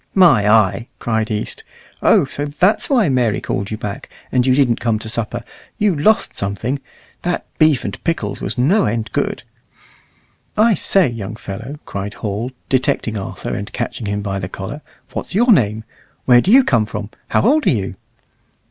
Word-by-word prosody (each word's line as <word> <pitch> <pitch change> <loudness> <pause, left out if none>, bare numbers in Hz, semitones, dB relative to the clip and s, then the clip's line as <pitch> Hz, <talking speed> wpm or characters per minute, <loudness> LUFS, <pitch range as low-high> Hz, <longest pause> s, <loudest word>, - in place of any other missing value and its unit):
"My 135 - +6
eye!" 110 +2 +3
cried 110 -2 -1
East, 105 -1 -3 0.4
"Oh! - - +5
so 145 +2 -4
that's 175 +8 +1
why 245 -9 +3
Mary 125 -6 +1
called 100 +1 -3
you 110 - -4
back, 105 -1 -6 0.2
and 125 0 +2
you 130 - +4
didn't 130 -4 +2
come 115 -2 +1
to 110 - -7
supper. 115 -1 -3 0.3
You 205 -4 +2
lost 210 +9 +2
something. 100 +8 -2 0.4
That 175 0 -2
beef 155 -5 +4
and 100 - -6
pickles 165 -1 -2
was - - -3
no 145 - +3
end 110 +1 -2
good." - - -1 1.1
"I 220 +1 +5
say, 190 0 +3
young 115 -3 -5
fellow," 115 +8 -7
cried 100 +1 -5
Hall, 105 +3 -3 0.2
detecting 130 -4 0
Arthur 100 -2 -5
and 100 - -5
catching 120 -2 -3
him 105 0 -2
by 100 -1 -2
the 90 -1 -5
collar, 100 +11 -6 0.3
"what's - - -5
your 240 +4 +5
name? 110 - +3 0.4
Where 120 -1 +6
do 185 - -2
you 265 +3 +8
come 115 - +2
from? 105 -1 -6 0.2
How - - +2
old 295 +8 +3
are - - +7
you?" 100 -5 -1
120 Hz, 175 wpm, -18 LUFS, 105-150 Hz, 1.1 s, you